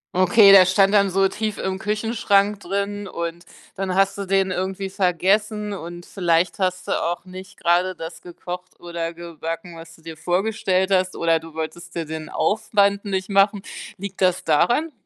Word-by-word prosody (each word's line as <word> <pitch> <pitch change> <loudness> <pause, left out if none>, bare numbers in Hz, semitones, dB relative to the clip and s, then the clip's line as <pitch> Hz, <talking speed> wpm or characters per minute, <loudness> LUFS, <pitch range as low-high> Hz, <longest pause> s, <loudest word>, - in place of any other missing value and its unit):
Okay, 195 +3 +6
das 185 -1 +8
stand 195 +1 +4
dann 200 -2 +4
so 195 +1 +3
tief 215 +1 -4
im 190 0 -2
Küchenschrank 210 -1 +1
drin 200 +2 -3
und 170 0 -5 0.3
dann 190 -1 -2
hast 195 +1 +2
du 200 - -4
den 195 0 +1
irgendwie 190 +1 -3
vergessen 205 +3 0
und 175 -2 -7
vielleicht 175 -2 0
hast 185 -1 -2
du - - 0
auch 175 +1 -3
nicht 185 0 -11
gerade 180 +2 +2
das 165 0 -9
gekocht 180 +1 -9
oder 170 -1 -5
gebacken 170 +2 -7
was 165 0 -12
du 160 - -22
dir 160 -1 -9
vorgestellt 190 +1 0
hast 185 -1 +1
oder 165 -1 +2
du 160 0 -13
wolltest 170 +2 -6
dir 165 -2 -3
den 155 0 -6
Aufwand 205 -1 +1
nicht 190 0 -2
machen. 200 0 +3 0.4
Liegt 195 -1 -7
das 185 0 +2
daran? 240 - +2
185 Hz, 170 wpm, -22 LUFS, 170-200 Hz, 0.4 s, das